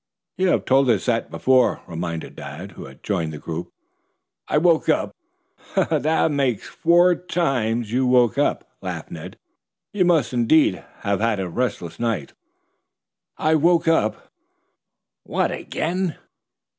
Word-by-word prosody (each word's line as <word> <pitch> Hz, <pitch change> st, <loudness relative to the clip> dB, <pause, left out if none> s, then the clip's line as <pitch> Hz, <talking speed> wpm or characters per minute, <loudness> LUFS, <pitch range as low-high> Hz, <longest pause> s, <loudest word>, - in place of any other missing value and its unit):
"You 190 Hz, -, +1 dB
have -, -, +1 dB
told 135 Hz, 0 st, +3 dB
us 110 Hz, -5 st, +2 dB
that 115 Hz, -2 st, 0 dB
before," 130 Hz, -2 st, +2 dB
reminded 85 Hz, -1 st, -5 dB
Dad, 80 Hz, +8 st, -8 dB
who -, -, -10 dB
had 65 Hz, 0 st, -14 dB
joined 85 Hz, -6 st, -1 dB
the 75 Hz, -, -7 dB
group. 85 Hz, +3 st, -6 dB, 0.8 s
"I -, -, +1 dB
woke 165 Hz, 0 st, +3 dB
up 155 Hz, -, +1 dB, 0.4 s
" -, -, -23 dB
"That 160 Hz, -4 st, +2 dB
makes 135 Hz, -7 st, 0 dB
four 175 Hz, +2 st, +4 dB
times 125 Hz, -11 st, -1 dB
you 130 Hz, +2 st, +1 dB
woke 125 Hz, -3 st, +4 dB
up," -, -, 0 dB
laughed -, -, -6 dB
Ned. -, -, -8 dB, 0.6 s
"You 200 Hz, -3 st, +2 dB
must, 165 Hz, -8 st, +2 dB
indeed, 120 Hz, -2 st, +3 dB, 0.2 s
have 100 Hz, -1 st, 0 dB
had 110 Hz, -2 st, +1 dB
a 95 Hz, -, -2 dB
restless 90 Hz, -4 st, -3 dB
night." 115 Hz, -11 st, -2 dB, 1.0 s
"I 155 Hz, +1 st, +2 dB
woke 170 Hz, +2 st, +3 dB
up 160 Hz, -10 st, +1 dB, 0.4 s
" -, -, -61 dB, 0.2 s
"What -, -, -1 dB
again?" 175 Hz, +1 st, -2 dB
125 Hz, 145 wpm, -22 LUFS, 100-160 Hz, 1.0 s, four